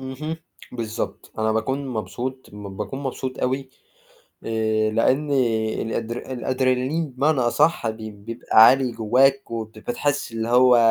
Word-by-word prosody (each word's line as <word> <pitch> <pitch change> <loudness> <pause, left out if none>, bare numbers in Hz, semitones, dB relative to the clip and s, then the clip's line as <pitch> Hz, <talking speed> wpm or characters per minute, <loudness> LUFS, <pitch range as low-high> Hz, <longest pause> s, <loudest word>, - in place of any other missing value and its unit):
اهم 135 +5 -5 0.4
بالضبط، 115 -3 -5
أنا 110 0 +1
باكون 130 +6 -1
مبسوط، 125 +3 -5
م 100 -2 -9
باكون 105 +6 -4
مبسوط 130 -1 -4
أوي، 130 +1 -1 0.8
آآ، 110 -1 0
لأن 130 +7 +1 0.5
الأدر 115 +1 -3 0.2
الأدرينالين 130 +4 0
بمعنى 135 +3 +1
أصح 120 +2 +2
بي 110 0 -5
بيبقى 110 +2 +3
عالي 130 -2 +4
جواك، 130 +5 +2
وبت 110 -1 -5
بتحس 130 +4 -2
اللي 115 0 -3
هو 125 +1 +6
125 Hz, 125 wpm, -23 LUFS, 110-130 Hz, 0.8 s, هو